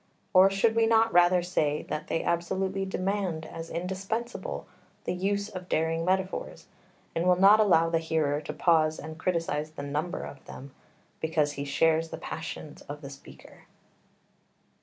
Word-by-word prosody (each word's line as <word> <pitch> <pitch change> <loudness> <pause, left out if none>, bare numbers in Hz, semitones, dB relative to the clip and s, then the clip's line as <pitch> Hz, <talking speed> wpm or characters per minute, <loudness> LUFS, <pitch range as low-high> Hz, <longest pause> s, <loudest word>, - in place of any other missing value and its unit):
Or 185 +1 +7
should 210 +3 +2
we 225 0 +4
not 225 0 +4
rather 175 0 +5
say 150 -4 0
that 155 - -5
they 165 - -1
absolutely 190 +3 -1
demand 190 -4 -2
as 165 0 -8
indispensable 195 +5 -4 0.4
the - - -2
use 200 +3 -1
of 185 -4 -8
daring 165 +1 0
metaphors, 190 +1 -2 0.5
and 170 +2 0
will 180 - +6
not 200 +3 +7
allow 175 -6 +5
the 165 0 +1
hearer 155 -3 0
to 150 - -5
pause 155 0 +2
and 155 +1 -8
criticise 165 -4 -1
the 155 -2 -8
number 150 +5 -3
of 135 - -9
them, 135 0 -10 0.5
because 155 -2 +1
he 140 -1 -5
shares 160 +3 +2
the - - -6
passion 160 -2 -7
of 145 +1 -6
the 140 -1 -8
speaker? 135 - -14
170 Hz, 160 wpm, -28 LUFS, 155-190 Hz, 0.5 s, Or